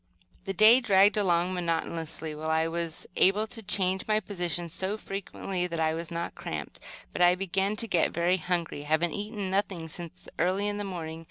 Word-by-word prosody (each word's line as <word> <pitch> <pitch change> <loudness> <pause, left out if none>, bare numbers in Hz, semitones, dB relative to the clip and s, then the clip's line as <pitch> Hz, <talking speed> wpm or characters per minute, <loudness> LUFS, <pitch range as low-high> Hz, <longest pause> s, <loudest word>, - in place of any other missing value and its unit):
The 195 - -2
day 215 +5 +7
dragged 205 -3 +5
along 180 -3 +2
monotonously, 165 -2 -3
while 155 +1 -5
I 160 +1 +2
was 165 -1 -2
able 200 +3 +4
to 225 +1 -3
change 190 -2 +1
my 215 0 +3
position 175 -4 -1
so 190 +5 -2
frequently 195 -2 -4
that 170 -2 -4
I 160 0 +2
was 165 0 -5
not 170 0 -4
cramped; - - -6 0.3
but - - -3
I 175 0 +6
began 195 +2 -1
to 220 - 0
get 175 - +2
very 175 +2 +1
hungry, 170 -4 -2
having 155 +3 +1
eaten 205 -2 -4
nothing 190 -4 -1
since 170 +2 -10
early 185 +4 +1
in 205 0 -2
the - - -2
morning. 165 -4 -5
180 Hz, 185 wpm, -28 LUFS, 165-200 Hz, 0.3 s, day